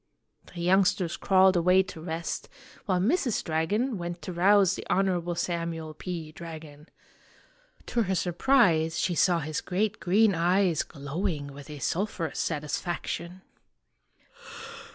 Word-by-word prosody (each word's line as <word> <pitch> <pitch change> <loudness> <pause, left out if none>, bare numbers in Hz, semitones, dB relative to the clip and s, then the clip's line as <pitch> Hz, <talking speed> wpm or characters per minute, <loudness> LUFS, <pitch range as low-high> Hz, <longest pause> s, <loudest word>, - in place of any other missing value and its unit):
The 170 - -5
youngsters 180 -1 +2
crawled 190 0 +4
away 180 +2 +4
to 185 -3 -10
rest, 165 0 -4 0.4
while 185 -2 +2
Mrs. 245 - +1
Dragon 200 +9 -1
went 175 0 -5
to 180 - -5
rouse 195 +2 +4
the - - -5
Honorable 180 -2 +1
Samuel 170 -2 -3
P. 165 -1 -6
Dragon. 155 -2 -10 1.0
To 240 - 0
her 190 -3 0
surprise 175 -3 +2
she 180 - 0
saw 175 0 +3
his 150 +1 -3
great 205 +3 -1
green 200 +5 +3
eyes 175 0 +2
glowing 145 0 -4
with 140 0 -11
a 150 - -7
sulphurous 170 +1 -2
satisfaction. 170 +3 -3
175 Hz, 125 wpm, -27 LUFS, 160-190 Hz, 1.0 s, crawled